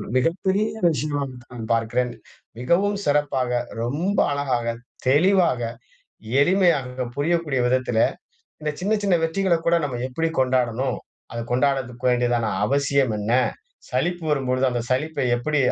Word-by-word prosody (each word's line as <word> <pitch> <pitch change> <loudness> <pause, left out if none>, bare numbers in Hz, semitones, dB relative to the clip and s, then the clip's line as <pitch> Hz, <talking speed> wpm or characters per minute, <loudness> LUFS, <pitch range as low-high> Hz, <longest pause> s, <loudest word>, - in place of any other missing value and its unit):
மிகப்பெரிய 190 +9 +1 0.2
விஷயமாத்தான் 135 -7 -3
பார்க்கிறேன். 120 +2 0 0.5
மிகவும் 195 +10 +2
சிறப்பாக, 145 -4 +1 0.3
ரொம்ப 165 +12 -1
அழகாக, 125 -5 -1 0.3
தெளிவாக, 170 -1 +4 0.8
எளிமையாக, 145 -9 +1
புரியக்கூடிய 155 -2 0
விதத்தில, 125 -2 +1 0.6
இந்த 150 - 0
சின்ன 200 +3 +1
சின்ன 195 -3 +3
வெற்றிகளக்கூட 170 -1 +1
நம்ம 125 -4 -5
எப்டி 165 +5 -1
கொண்டாடணும், 125 0 0 0.3
அத 115 - -4
கொண்டாடதுக்கு 130 -2 0
வேண்டியதான 120 -2 +1 0.2
அவசியம் 140 -2 +1
என்ன? 105 +3 -1 0.6
சலிப்பு 175 -1 -1
வரும்பொழுது 130 -2 0
அந்த 120 - -1
சலிப்பை 145 +1 -1
எப்படி 150 +5 0
135 Hz, 105 wpm, -23 LUFS, 125-165 Hz, 0.8 s, தெளிவாக